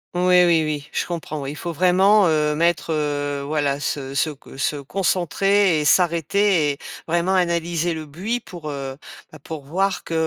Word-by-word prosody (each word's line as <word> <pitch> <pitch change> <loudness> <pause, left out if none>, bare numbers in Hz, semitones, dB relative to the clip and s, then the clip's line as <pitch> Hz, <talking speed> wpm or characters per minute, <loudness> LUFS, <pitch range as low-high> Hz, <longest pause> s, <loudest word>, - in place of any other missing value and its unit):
Oui, 180 0 +5
oui, 165 -2 +3
oui, 150 -2 -3
je - - -2
comprends. 160 -4 -5
Oui, 135 - -4
il 150 - -8
faut 170 +1 -5
vraiment, 190 +4 +4
heu, 150 -2 +2
mettre, 165 +1 0
heu, 145 -2 -2
voilà 145 -2 0
se 135 -2 -3
se 145 +3 +1
co 135 -2 -12
se 150 - 0
concentrer 185 +3 +1
et 150 - -2
s'arrêter 170 -1 +2
et - - -11 0.3
vraiment 175 +3 +1
analyser 170 -2 0
le 155 -1 -6
buis 190 +11 -3
pour, 170 -9 -9
heu, 135 -2 -5 0.4
bah, 155 - -13
pour 150 +1 -8
voir 190 +6 -1
que, - - -7
165 Hz, 180 wpm, -22 LUFS, 150-180 Hz, 0.4 s, Oui